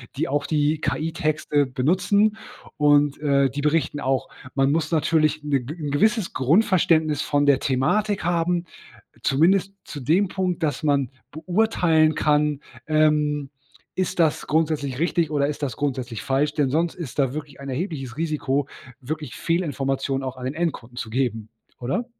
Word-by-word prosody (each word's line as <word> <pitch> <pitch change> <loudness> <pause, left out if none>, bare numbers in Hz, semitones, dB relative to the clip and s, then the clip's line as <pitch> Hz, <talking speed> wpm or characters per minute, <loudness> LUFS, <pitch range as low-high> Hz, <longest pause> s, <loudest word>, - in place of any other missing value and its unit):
die - - -1
auch 145 +1 -1
die 150 0 +1
KI-Texte 155 0 0
benutzen 185 +11 +1 0.4
und, 145 -1 +3
äh, 140 -2 +3
die 140 +3 -4
berichten 150 -1 0
auch, 135 -1 -1 0.2
man 135 0 +2
muss 160 +1 0
natürlich 155 -1 +2
'n 150 - -5
'n 145 +3 -2
gewisses 215 +7 +1
Grundverständnis 160 - +2
von 145 0 +1
der 140 -2 +5
Thematik 195 +12 0
haben, 175 +1 0 0.6
zumindest 190 +7 +2
zu 145 - -8
dem 170 +10 +2
Punkt, 185 -2 -2
dass 150 0 -1
man 140 -4 +1 0.2
beurteilen 165 -2 +2
kann, 150 -1 +1 0.3
ähm, 150 -2 +2 0.4
ist 185 0 -2
das 160 -2 +2
grundsätzlich 150 -4 0
richtig 170 0 +1
oder 145 -2 +1
ist 150 0 -5
das 130 -6 -2
grundsätzlich 130 -5 -3
falsch. 145 +2 0
Denn 145 -3 +1
sonst 165 +4 0
ist 160 -7 -8
da 135 -2 +1
wirklich 145 -2 -7
ein 140 - -8
erhebliches 135 -3 -4
Risiko, 145 -3 -1 0.3
wirklich 150 0 -5
Fehlinformationen 135 -5 -1
auch 130 -1 -5
an 125 - -7
den 130 - -2
Endkunden 150 -8 -3
zu 120 - -4
geben, 115 -3 -1 0.3
oder? 135 - -2
150 Hz, 150 wpm, -23 LUFS, 135-165 Hz, 0.6 s, der